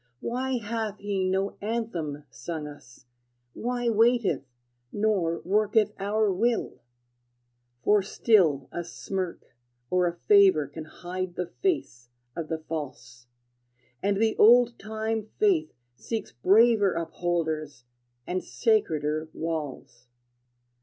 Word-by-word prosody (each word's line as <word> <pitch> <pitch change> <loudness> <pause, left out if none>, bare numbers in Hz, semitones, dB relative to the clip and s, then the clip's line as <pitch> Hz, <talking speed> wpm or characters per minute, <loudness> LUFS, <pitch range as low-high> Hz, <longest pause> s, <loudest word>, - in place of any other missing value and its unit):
Why 255 +2 -2
hath 220 -2 -3
he 200 -2 -2
no 190 +1 -1
anthem 190 -10 -3
sung 160 +3 -5
us, 135 -5 -13 0.5
Why 245 0 -2
waiteth, 230 - +3 0.5
nor 195 -6 0
worketh 210 +2 +2
our 205 +1 +1
will? 230 +5 0 1.0
For 210 -1 +4
still 180 - +3
a 175 - -4
smirk 180 -4 -5 0.4
or 180 -1 +3
a 170 - -3
favor 195 -6 +5
Can 155 +3 -9
hide 180 +2 -6
the 180 - -2 0.2
face 210 - -1 0.3
of 165 -2 -4
the 160 - -2
false; 130 -6 -7 0.7
And 200 0 +1
the 220 +1 +2
old 240 +2 +6
time 220 0 -3
Faith 365 -7 +2 0.2
seeks 225 - -5
braver 205 - +4
Upholders, 160 -4 -2 0.4
and 185 +1 -2
sacreder 155 - 0
walls. 150 -6 -5
190 Hz, 110 wpm, -27 LUFS, 160-220 Hz, 1.0 s, old